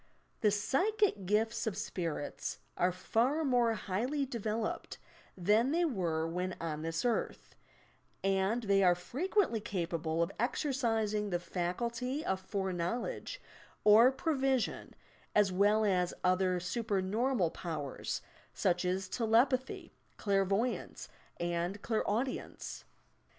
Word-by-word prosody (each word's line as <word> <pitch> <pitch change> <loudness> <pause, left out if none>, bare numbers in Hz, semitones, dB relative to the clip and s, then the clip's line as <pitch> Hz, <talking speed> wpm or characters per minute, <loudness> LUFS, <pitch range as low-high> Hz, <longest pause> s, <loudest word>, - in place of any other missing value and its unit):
The 215 - +4
psychic 275 - +1
gifts 220 +3 +1
of 200 -3 -2
spirits 170 -7 -3 0.2
are 180 +1 +2
far 245 - +1
more 240 -4 +3
highly 245 +10 -1
developed 225 -3 -3 0.4
than 210 +7 +3
they 340 +4 +2
were 170 - 0
when 180 +2 -2
on 155 -2 -3
this 165 +5 -2
earth, 240 - -1 0.7
and 195 +4 +1
they 200 -2 +3
are 180 -2 +5
frequently 280 - 0
capable 170 -4 -1
of 170 - -3
exercising 225 -5 0
the 175 - +1
faculty 235 - -2
of 190 0 0
fore 190 0 -2
knowledge 180 - -3 0.4
or 220 +4 +8
prevision 270 -4 0 0.4
as 205 -2 +4
well 205 +3 +3
as 180 -3 +1
other 185 0 +2
supernormal 205 +1 0
powers, 155 -6 -4
— - - -29
such 180 -1 +3
as 185 +1 -1
telepathy, 245 +5 +1 0.2
clairvoyance 200 +4 0 0.3
and 175 +3 -2
clairau 220 +1 +1
dience. 260 - -7
205 Hz, 115 wpm, -33 LUFS, 180-240 Hz, 0.7 s, or